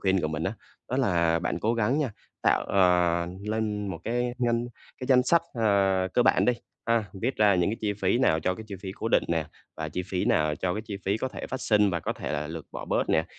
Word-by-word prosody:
khuyên 95 -1 +2
của 80 - -1
mình 75 0 -3
á, 95 - 0 0.4
đó 130 - -1
là 85 -10 +2
bạn 85 - -2
cố 110 +5 +1
gắng 115 +5 +1
nha, 145 -5 0 0.3
tạo, - - +3
ờ, 90 -2 +3 0.2
lên 105 -1 -1
một 85 - -4
cái 120 +1 -1
ngân 120 -1 0 0.3
cái 130 - -4
danh 125 -1 +5
sách, 165 +6 +3
à, 100 -4 +2
cơ 125 - +5
bản - - +4
đi 125 - +4 0.3
ha, 115 -1 +2 0.2
viết 130 +3 0
ra 105 -2 +5
những 90 +1 +2
cái 110 - -3
chi 105 -2 0
phí 100 +2 +1
nào 80 -11 +3
cho 90 +3 0
cái 110 - -9
chi 100 - -5
phí 95 -2 -5
cố 110 - -4
định - - +4
nè, 80 -2 +1 0.3
và 80 -1 -3
chi 90 +4 -3
phí 95 -1 -1
nào 75 -1 +2
cho 90 +3 -2
cái 110 - -3
chi 105 -3 -5
phí 100 +2 +1
có 130 +4 -2
thể - - -7
phát 130 - -5
sinh 105 -4 +3
và 85 -2 -1
có - - -2
thể - - -5
là 75 0 -2
lượt 80 0 -7
bỏ - - -6
bớt - - 0
nè. 80 - +3
100 Hz, 260 wpm, -27 LUFS, 90-115 Hz, 0.4 s, danh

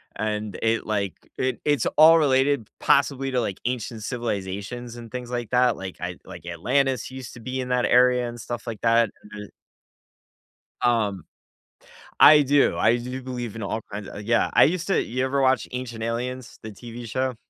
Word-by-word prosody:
and 105 -1 -3
it 115 0 +1
like, 100 -4 -1 0.2
it 130 0 -1
it's 145 -2 +2
all 160 +2 +8
related 135 -4 +2
possibly 135 -1 +2
to, 125 - +1
like, 100 -4 -4
ancient 120 -3 -3
civilizations 115 +1 -4
and 115 -2 -10
things 125 -1 -6
like 120 -2 -4
that, 125 -1 +3
like, 95 -1 -7
I 90 0 -4
like, 85 - -11
Atlantis 130 +10 0
used 130 -2 -8
to 120 - -12
be 130 +2 -4
in 125 0 -4
that 125 -1 +2
area 125 0 +4
and 120 0 -9
stuff 120 +1 -6
like 115 -3 -5
that, 115 -1 +3 0.2
and 105 0 -7
eh - - -24 1.3
Um, 105 -8 +1 0.9
I 150 0 +9
do, 140 0 +3
I 115 +2 +3
do 125 +2 -6
believe 120 -4 -5
in 110 - -5
all 110 +3 -3
kinds 105 -1 -6
o - - -9
yeah, 115 +2 +1
I - - +7
used 170 +2 -1
to 195 - +2
you 130 +3 -2
ever 135 +1 0
watch 130 -1 +2
Ancient 120 -3 -5
Aliens, 125 +2 -4
the 110 - -8
TV 120 +2 -9
show? 130 +2 -1
120 Hz, 185 wpm, -24 LUFS, 110-130 Hz, 1.3 s, I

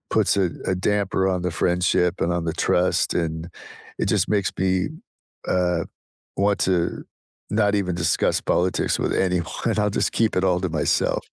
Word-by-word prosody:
puts - - +3
a 95 -3 +2 0.2
a 95 - 0
damper 95 0 0
on 90 - -2
the 90 - -1
friendship 90 +1 +1
and 85 - +1
on 85 -1 -2
the 80 - -1
trust, - - +2
and 80 0 -2 0.5
it - - 0
just 100 -3 +2
makes 100 -3 +1
me, 95 0 +1 0.6
uh, 90 -2 +1 0.5
want 100 0 +2
to 90 -2 0 0.5
not 105 -1 +2
even 90 -3 0
discuss 85 - +1
politics 90 +1 +1
with - - -1
anyone. 90 +2 -1
I'll 105 0 +2
just - - +1
keep 110 -4 +1
it 90 - +2
all 90 -1 +2
to 90 - -1
myself. 80 -1 0
90 Hz, 170 wpm, -23 LUFS, 85-100 Hz, 0.6 s, puts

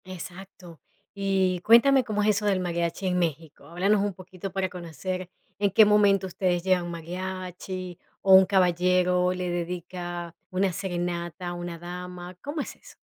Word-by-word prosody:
Exacto. 180 -2 -10 0.3
Y 190 -2 +1
cuéntame 255 +6 +6
cómo 210 -3 -1
es 215 - +3
eso 210 0 +1
del 195 -2 +2
mariachi 170 +1 -2
en 180 0 +1
México. 160 -2 -3
Háblanos 195 +4 +2
un 205 -1 -1
poquito 185 +1 -8
para 190 0 -1
conocer 180 +1 -5 0.3
en 200 0 +3
qué 215 +3 +7
momento 205 -2 +4
ustedes 180 -1 0
llevan 185 -2 +2
un 175 - -5
mariachi, 185 +1 -6 0.2
o 195 - +6
un 190 0 +8
caballero 180 -1 +3
le 180 -1 -3
dedica 175 0 -5 0.2
una 185 0 +1
serenata 175 -1 -3
a - - -4
una 175 -1 -6
dama, 180 +1 -8
¿cómo 295 +2 -3
es - - -7
eso? - - -17
180 Hz, 160 wpm, -26 LUFS, 175-195 Hz, 0.3 s, un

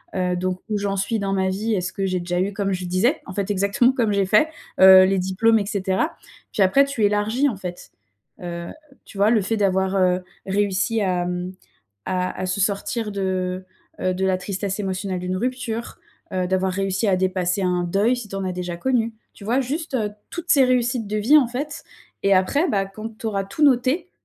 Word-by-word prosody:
heu, 180 -1 0
donc 185 0 -2
«Où 210 - 0
j'en 200 -1 -1
suis 215 +3 -1
dans 195 -1 -1
ma 190 -1 +1
vie? 215 +4 -1
Est-ce 185 -1 -3
que 195 - -2
j'ai 185 -1 -1
déjà 175 0 -2
eu?» 200 +2 -1
Comme 195 0 -1
je 185 0 -3
disais, 185 - +1
en 185 - -7
fait, 200 +1 -2
exactement, 200 +5 +3
comme 225 -5 +1
j'ai 200 -1 +2
fait, 210 +10 +4 0.3
heu, 190 0 +10
les 195 0 +1
diplômes 205 +5 +2
et 200 - -2
cetera 195 - -1 0.4
puis 200 - +3
après 275 +9 +4
tu 275 -6 -2
élargis, 215 +7 +1
en 215 - -5
fait, 180 -2 -8 0.5
heu, 170 -1 -5 0.4
tu 200 - -13
vois? 205 +2 +4
Le 220 - +3
fait 220 +4 -1
d'avoir, 190 -1 +1
heu, 180 -1 +2 0.2
réussi 205 +3 0
à, 180 -3 0
hem, 180 +1 -4 0.5
à 185 -1 -2
à 185 - -1
se 185 +2 -2
sortir 210 +3 -1
de, 185 -1 -2 0.4
heu, 185 - +1
de 190 +1 -1
la 190 -1 +2
tristesse 195 +2 -3
émotionnelle 190 -1 -3
d'une 180 +1 -2
rupture, 240 0 -3 0.3
heu, 185 -1 0
d'avoir 190 0 +1
réussi 195 +2 -1
à 190 - +3
dépasser 185 +1 0
un 180 -1 +1
deuil 200 +8 +2
si 240 -4 -7
tu 195 - -9
en 195 - -3
as 185 - -2
déjà 180 -1 -4
connu, 230 +2 0 0.2
tu 200 - -13
vois, 240 +6 +1
juste, 290 +4 -4
heu, 215 -5 0 0.2
toutes 345 0 -6
ces 275 -3 +6
réussites 245 -2 +1
de 210 - -2
vie, 275 +9 +6
en 275 - +3
fait 285 +5 -5 0.4
et 195 - +5
après, 280 - +2
bah, 195 -6 +1
quand 215 +3 -8
tu - - -5
auras 200 -3 -1
tout 195 +10 -5
noté, 280 +6 +2
195 Hz, 215 wpm, -22 LUFS, 185-225 Hz, 0.5 s, heu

